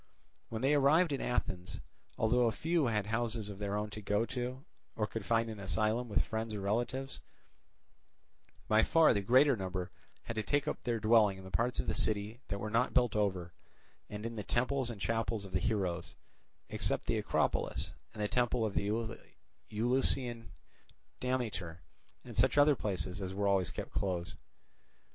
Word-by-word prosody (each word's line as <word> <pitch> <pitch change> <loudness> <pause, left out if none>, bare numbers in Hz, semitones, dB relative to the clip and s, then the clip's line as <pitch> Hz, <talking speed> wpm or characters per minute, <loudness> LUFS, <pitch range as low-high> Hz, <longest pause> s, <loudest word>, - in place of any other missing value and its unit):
When 115 +2 -4
they 140 +2 +4
arrived 150 +3 +4
at 135 - -2
Athens, 95 -7 -2 0.4
though 120 +2 +3
a - - +2
few 160 +5 +1
had 105 -3 0
houses 110 -1 -1
of 100 -1 -8
their 100 0 -1
own 105 0 -3
to 105 +1 -6
go 105 +2 +1
to, 125 +2 -4 0.3
or 105 - 0
could 110 0 -5
find 115 +2 +2
an 110 -2 -6
asylum 110 +4 0
with 105 - +1
friends 110 -1 -3
or - - -4
relatives, 120 +6 -2 1.5
by 110 +1 +5
far 165 +4 +5
the 100 - 0
greater 130 +7 +5
number 95 -3 -4 0.3
had 115 - -5
to - - +2
take 140 +7 0
up - - -2
their 120 -2 -1
dwelling 110 -3 +4
in 95 - -10
the 95 - -10
parts 120 +4 0
of - - 0
the - - 0
city 110 +3 0
that 100 - -3
were 105 +1 -4
not 115 +3 +1
built 125 -4 +3
over 95 -5 0 0.6
and 105 +1 -6
in 115 0 -4
the 105 - -3
temples 125 +2 0
and 115 -4 -6
chapels 115 -1 -1
of 95 - -10
the - - +1
heroes, 95 -6 -1 0.5
except - - 0
the - - +1
Acropolis - - 0 0.2
and 105 - -4
the - - +1
temple 120 0 +1
of 105 - -2
the 100 - 0 0.8
Eleusinian 120 +1 0 0.7
Demeter 110 -10 -2 0.4
and 120 -2 -9
such 125 +5 +3
other 145 +1 +7
Places 95 -3 -2
as 95 0 -4
were 100 0 0
always 95 -3 +2
kept - - -6
closed. 90 -3 -2
110 Hz, 180 wpm, -33 LUFS, 100-125 Hz, 1.5 s, other